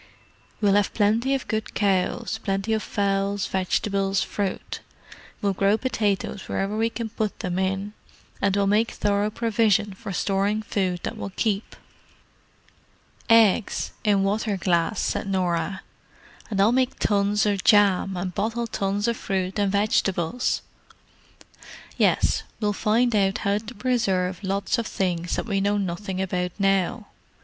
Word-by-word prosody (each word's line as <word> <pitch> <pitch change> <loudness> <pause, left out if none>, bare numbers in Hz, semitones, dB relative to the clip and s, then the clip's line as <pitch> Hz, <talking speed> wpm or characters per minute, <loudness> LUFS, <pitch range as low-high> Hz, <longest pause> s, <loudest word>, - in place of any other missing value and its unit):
We'll 205 -2 +4
have 205 0 +2
plenty 230 +6 +2
of 270 - -4
good 220 -1 -3
cows, 205 +3 0
plenty 195 +3 -1
of 220 - +1
fowls, 200 -1 0
vegetables, 195 +1 0
fruit; 200 -2 -3 0.6
we'll 200 -1 +2
grow 200 +2 +2
potatoes 210 -5 -2
wherever 195 +2 -1
we 225 +1 +1
can 230 -1 -5
put 215 -1 -3
them 180 0 -2
in, 190 +2 -1 0.5
and 200 -1 +2
we'll 200 -1 +2
make 210 +3 +3
thorough 205 0 0
provision 215 -2 +1
for 200 +1 -7
storing 200 +3 0
food 185 -4 -1
that - - -4
will - - -5
keep." 210 -2 -1 1.5
"Eggs—in 210 -2 +3
water 205 +1 0
glass," 175 +2 +1
said - - -1
Norah. 185 0 -1 0.7
"And 200 -3 -2
I'll 205 +3 +5
make 255 0 +1
tons 205 0 +2
of 200 -2 0
jam 195 -3 +4
and 180 0 -3
bottle 225 +5 -1
tons 205 -1 -1
of 235 - +1
fruit 190 -1 -2
and 200 -1 +2
vegetables." 200 0 0 1.3
"Yes. - - +2 0.2
We'll 210 -1 0
find 225 +3 +2
out 195 0 +2
how 200 +1 +2
to 225 +3 -10
preserve 200 -6 0
lots 200 +5 0
of 230 - -2
things 175 -2 -1
that - - -2
we 200 -3 0
know 205 +1 +1
nothing 190 0 -3
about 180 -2 -1
now. 195 +3 +1
200 Hz, 140 wpm, -24 LUFS, 195-215 Hz, 1.5 s, I'll